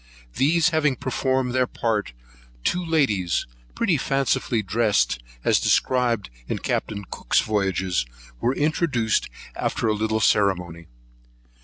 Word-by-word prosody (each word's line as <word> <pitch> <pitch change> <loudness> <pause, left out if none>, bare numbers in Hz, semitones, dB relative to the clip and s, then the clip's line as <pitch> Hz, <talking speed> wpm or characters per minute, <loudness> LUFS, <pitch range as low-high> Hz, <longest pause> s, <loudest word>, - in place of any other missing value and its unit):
These 165 +5 +3
having 155 -5 +1
performed 130 0 -1
their 130 -1 +2
part, 110 - -2 0.5
two 180 0 0
ladies, 110 - +1 0.3
pretty 190 -9 +2
fancifully 135 -4 0
dressed, 105 - +1 0.2
as - - +3
described 120 - +1 0.2
in - - -2
Captain 100 -2 -3
Cook's - - +1
Voyages, 95 - 0 0.3
were 125 +3 0
introduced 145 -7 +1 0.3
after - - -2
a 110 - +3
little 110 +1 0
ceremony. 90 -6 +1
115 Hz, 115 wpm, -24 LUFS, 100-135 Hz, 0.5 s, These